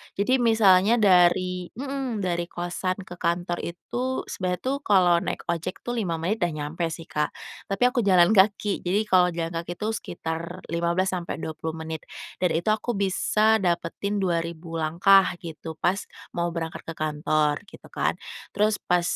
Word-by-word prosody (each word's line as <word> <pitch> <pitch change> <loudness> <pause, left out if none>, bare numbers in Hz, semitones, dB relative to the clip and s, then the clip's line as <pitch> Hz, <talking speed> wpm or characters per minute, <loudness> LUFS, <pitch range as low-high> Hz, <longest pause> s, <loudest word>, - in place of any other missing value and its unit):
jadi 255 +6 +2
misalnya 220 -2 +5
dari 180 -3 +3
mhm 265 -4 -3
dari 175 -1 -1
kosan 175 +1 -3
ke 175 -1 -11
kantor 175 +1 -1
itu 245 +9 -3
sebenarnya 180 -1 -2
tuh 265 +2 0
kalau 185 -8 +4
naik - - -4
ojek 170 +2 -4
tuh 240 -1 -2
5 175 -6 -1
menit 180 +7 -1
udah 175 -1 +1
nyampe 165 +3 -2
sih, 165 0 -6
Kak, 150 0 +1 0.4
tapi 195 +3 -1
aku 250 - 0
jalan 180 0 +6
kaki. 205 0 +3
Jadi, 195 +4 0
kalau 185 -3 +4
jalan 165 -1 -2
kaki 170 +1 -4
itu 210 - -3
sekitar 165 -5 -5
15 170 +3 +1
sampai 175 -2 -3
20 160 0 -4
menit 160 -1 -6 0.3
dan 180 -2 +1
itu 170 +6 +1
aku 220 +2 -1
bisa 215 +3 +2
dapetin 180 +3 -1
2000 170 -3 -2
langkah 180 +5 +5 0.2
gitu 160 -1 -7
pas 180 +5 +1 0.3
mau 170 0 -1
berangkat 165 0 -5
ke 165 - -4
kantor 155 +1 0
gitu - - -15
kan, - - 0 0.4
terus 210 +1 +2
pas 180 0 +1
180 Hz, 165 wpm, -25 LUFS, 170-205 Hz, 0.4 s, jalan